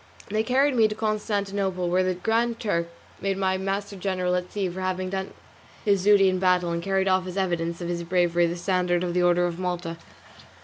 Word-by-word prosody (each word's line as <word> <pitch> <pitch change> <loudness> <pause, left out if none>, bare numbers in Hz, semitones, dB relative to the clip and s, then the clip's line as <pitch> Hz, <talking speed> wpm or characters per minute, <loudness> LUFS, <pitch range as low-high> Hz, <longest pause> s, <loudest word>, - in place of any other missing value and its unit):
They 215 +2 +1
carried 260 +4 +2
me 225 -2 +5
to 210 - -5
Constantinople, 200 -4 -1
where 180 +2 +2
the 185 0 0
Grand 230 +4 0
Turk, 170 -6 -1 0.3
Selim, - - -23
made 195 -1 -1
my 190 -1 0
master 195 +1 -3
general 185 -1 -1
at 180 0 -2
sea 200 -2 -1
for 180 +1 -6
having 185 0 -2
done 190 0 -3 0.5
his 200 -2 +2
duty 205 -2 +6
in 185 0 +2
the - - -5
battle 180 -2 +2
and 170 0 -2
carried 195 +1 0
off 185 -1 +2
as 185 +1 -6
evidence 170 -2 -1
of 175 - -3
his 170 0 -2
bravery 175 0 +2
the 170 - -3
standard 180 0 0
of 175 -1 -2
the 180 - +2
Order 175 0 +3
of 175 0 -3
Malta. 175 -2 -3
185 Hz, 220 wpm, -25 LUFS, 175-200 Hz, 0.5 s, duty